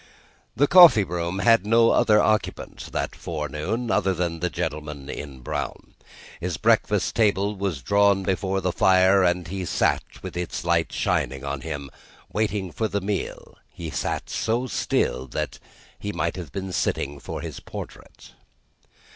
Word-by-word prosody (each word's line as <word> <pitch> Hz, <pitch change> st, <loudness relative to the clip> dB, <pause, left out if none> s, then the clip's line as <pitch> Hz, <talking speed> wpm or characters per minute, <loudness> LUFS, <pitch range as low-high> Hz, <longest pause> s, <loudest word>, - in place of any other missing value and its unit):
The 145 Hz, -, +4 dB
coffee 175 Hz, -, +8 dB
room 85 Hz, 0 st, -3 dB
had 115 Hz, +1 st, +4 dB
no 115 Hz, +2 st, +4 dB
other 105 Hz, -1 st, +4 dB
occupant, 110 Hz, 0 st, -1 dB
that -, -, -3 dB
forenoon, 80 Hz, -, -3 dB
than 90 Hz, -7 st, 0 dB
the 90 Hz, +2 st, -1 dB
gentleman 75 Hz, -4 st, -4 dB
in 70 Hz, -3 st, -8 dB
brown. -, -, -5 dB, 0.5 s
His 90 Hz, 0 st, -3 dB
breakfast 105 Hz, -4 st, +2 dB
table 105 Hz, -2 st, +2 dB
was 95 Hz, -9 st, -3 dB
drawn 100 Hz, +3 st, +3 dB
before 95 Hz, +1 st, -1 dB
the 90 Hz, -, 0 dB
fire, 95 Hz, +2 st, +4 dB
and 90 Hz, -1 st, +2 dB
as 80 Hz, -, -9 dB
he 95 Hz, -1 st, -3 dB
sat, 90 Hz, -, +1 dB, 0.2 s
with -, -, -7 dB
its 90 Hz, 0 st, -4 dB
light 85 Hz, -2 st, +1 dB
shining 65 Hz, +2 st, -1 dB
on 70 Hz, -1 st, -3 dB
him, 70 Hz, -1 st, -6 dB, 0.4 s
waiting 105 Hz, -4 st, -1 dB
for 110 Hz, +7 st, -1 dB
the 100 Hz, -1 st, -1 dB
meal, 100 Hz, 0 st, -4 dB
he -, -, -7 dB
sat -, -, -2 dB
so 115 Hz, +5 st, -1 dB
still, 65 Hz, -, -1 dB
that -, -, -4 dB, 0.4 s
he 105 Hz, -, -4 dB
might 85 Hz, -2 st, -2 dB
have 90 Hz, -3 st, -7 dB
been 95 Hz, -1 st, -5 dB
sitting 70 Hz, -5 st, -1 dB
for -, -, -6 dB
his -, -, -6 dB
portrait. -, -, -10 dB
95 Hz, 155 wpm, -24 LUFS, 80-105 Hz, 0.5 s, coffee